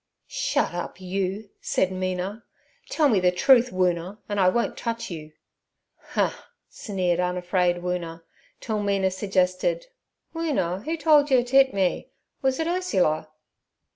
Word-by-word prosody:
'Shut - - -1
up, 175 +1 -5
you!' 195 +2 -3
said 190 - 0
Mina. 185 +3 -3 0.5
'Tell 305 -2 +3
me 220 -8 +3
the 180 0 +3
truth, 245 +7 +5
Woona, 180 +1 0
an' 205 -2 -2
I 185 -1 +5
won't 235 +5 0
touch 230 -4 -4
you.' 155 -2 -8 0.6
'Huh!' - - -2 0.2
sneered 180 -4 -2
unafraid 180 0 0
Woona, 170 -2 -4 0.4
till 215 -2 -2
Mina 195 -2 +1
suggested— 190 - 0 0.5
'Woona, 260 - -1
'oo 330 +1 -1
told 300 -2 +4
yer 255 -3 +4
t' 245 +2 -4
'it 270 -1 +6
me? 190 -4 -1 0.3
Was 265 +1 +1
it 320 - 0
Ursula?' 190 - 0
190 Hz, 140 wpm, -25 LUFS, 180-245 Hz, 0.6 s, it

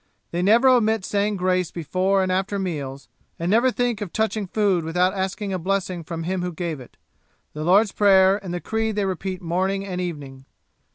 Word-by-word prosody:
They 175 - -1
never 225 +7 +5
omit 220 -5 +3
saying 205 +1 0
grace 185 -2 +1
before 185 +4 0
and 185 - -1
after 195 +2 -1
meals, 145 -8 -4 0.3
and 170 +2 -1
never 235 +4 +4
think 245 -3 -1
of 200 -5 -4
touching 220 -1 -1
food 195 -3 +1
without 180 +3 +1
asking 195 +1 -3
a 185 - -2
blessing 185 -1 -2
from 165 0 -5
Him 185 +2 -2
who 180 0 -3
gave 165 -3 -4
it. 125 - -14 0.6
The 150 - -5
Lord's 195 +5 +4
Prayer 195 0 +4
and 185 - -5
the 175 0 -3
Creed 220 -1 -2
they 205 -1 0
repeat 185 0 -4
morning 190 +3 -1
and 180 -2 -4
evening.' 140 -6 -6
190 Hz, 190 wpm, -23 LUFS, 175-205 Hz, 0.6 s, never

